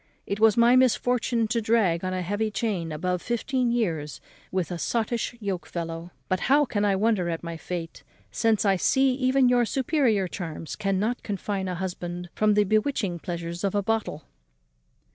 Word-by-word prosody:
It 200 - -3
was 220 -1 +5
my 235 +1 +6
misfortune 245 -2 +2
to 230 - +1
drag 210 -7 +2
on 185 - -1
a 185 0 -2
heavy 205 +4 -1
chain 200 -7 -2
above 180 +3 -2
fifteen 245 +1 -1
years 165 - -1 0.3
with 185 -3 -1
a 175 - -4
sottish 235 +3 -1
yoke 195 -5 -3
fellow. 165 0 -5 0.2
But 185 - 0
how 290 +2 +5
can 205 -5 -1
I 200 -1 +3
wonder 200 -3 +1
at 165 0 -3
my 170 -1 -5
fate, 165 0 -6 0.3
since 225 -2 +1
I 195 -1 +3
see 265 +7 +3
even 260 0 +3
your 245 -1 +4
superior 240 - +1
charms 165 -3 -6
cannot 210 +4 -1
confine 200 -1 -3
a 180 - -2
husband 175 -1 -5
from 215 -1 +2
the 210 - +5
bewitching 215 -3 0
pleasures 170 0 -5
of 200 0 0
a 205 - +1
bottle?" 225 +1 -2
205 Hz, 175 wpm, -26 LUFS, 175-235 Hz, 0.3 s, my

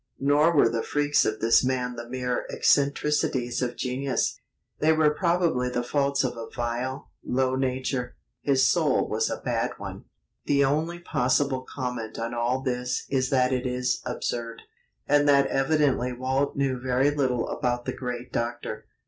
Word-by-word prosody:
Nor 145 +4 +3
were 140 - +6
the 115 0 -1
freaks 145 0 +1
of 110 0 -2
this 115 +3 +5
man 125 -1 -1
the 120 0 -8
mere 125 -1 -2
"eccentricities 140 -3 +1
of 125 -1 -2
genius"; 130 +1 -1 0.4
they 155 +1 +4
were 155 -1 +4
probably 170 -6 +1
the 120 -1 -2
faults 140 +2 +1
of 130 - -2
a 115 -1 -7
vile, 120 +2 -4
low 130 0 0
nature. 130 -1 -2 0.3
His 135 -2 +3
soul - - +2
was - - 0
a - - -3
bad - - -1
one. - - -8 0.4
The 140 -1 +3
only 155 +5 0
possible 135 -4 0
comment 125 -4 -4
on 115 +1 -3
all 120 +2 0
this 125 -1 -2
is 130 -2 +1
that 130 -1 +2
it 125 0 -1
is 125 0 -1
absurd, 120 -2 -4 0.4
and 145 0 +4
that 140 -1 +5
evidently 135 -3 +1
Walt 130 +3 -1
knew 135 -2 0
very 130 +3 +2
little 130 -5 0
about 120 -1 -1
the - - -2
great 125 -1 -6
Doctor. 115 -2 -3
130 Hz, 160 wpm, -26 LUFS, 125-140 Hz, 0.4 s, were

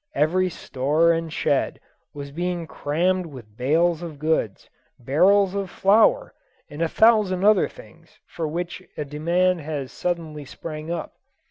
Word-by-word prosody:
Every 185 +4 +2
store 150 +2 +1
and 165 -1 -3
shed 140 -2 0 0.3
was 140 -1 -8
being 175 +2 -3
crammed 175 +5 -1
with 120 -8 -12
bales 160 +7 +1
of 165 -4 -7
goods, 150 -9 -1 0.3
barrels 185 +10 +3
of 200 -2 -3
flour, 225 - +3 0.4
and 145 +2 -7
a 165 - +1
thousand 210 -4 +3
other 210 -1 +5
things - - -17
for 165 -2 -4
which 170 +3 -4 0.2
a 150 - -3
demand 170 +5 +1
has 145 -3 -5
suddenly 165 -4 -3
sprung 155 +3 -8
up. 170 -2 -5
165 Hz, 140 wpm, -23 LUFS, 150-185 Hz, 0.4 s, other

